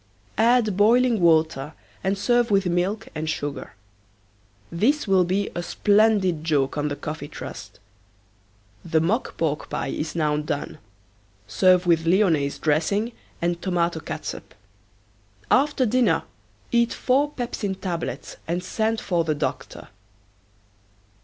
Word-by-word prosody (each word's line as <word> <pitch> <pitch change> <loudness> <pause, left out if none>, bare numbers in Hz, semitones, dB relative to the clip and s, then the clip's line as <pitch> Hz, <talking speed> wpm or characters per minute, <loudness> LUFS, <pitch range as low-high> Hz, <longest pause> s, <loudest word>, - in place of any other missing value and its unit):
Add 230 -3 +3
boiling 230 +3 +4
water 160 -3 +2 0.3
and 195 +1 0
serve 240 +3 +2
with 195 -2 +2
milk 180 +4 -1
and 155 0 -3
sugar. 145 -4 -4 1.0
This 230 - +1
will 190 -2 +4
be 195 +3 -1
a 175 - -3
splendid 200 -3 +2
joke 145 -4 +1
on 145 0 -1
the 145 - -3
Coffee 150 -1 -6
Trust. 145 - -9 1.0
The 160 -1 +1
mock 195 +10 -1
pork 155 -2 -2
pie - - -3
is 155 +1 -4
now 150 -2 +1
done. 150 -1 -4 0.7
Serve 180 - +3
with 165 -1 +2
lionaise 165 -7 +2
dressing 170 +9 0 0.3
and 170 0 0
tomato 175 -3 0
catsup. - - -7 1.0
After 280 -1 +3
dinner 250 +2 +2 0.5
eat 235 0 +3
four 275 +3 +1
pepsin 220 -5 -3
tablets 180 -3 -5
and 175 +2 -2
send 220 +3 -1
for 175 -3 0
the 155 -2 -1
doctor. 145 - -5
180 Hz, 125 wpm, -24 LUFS, 160-215 Hz, 1.0 s, boiling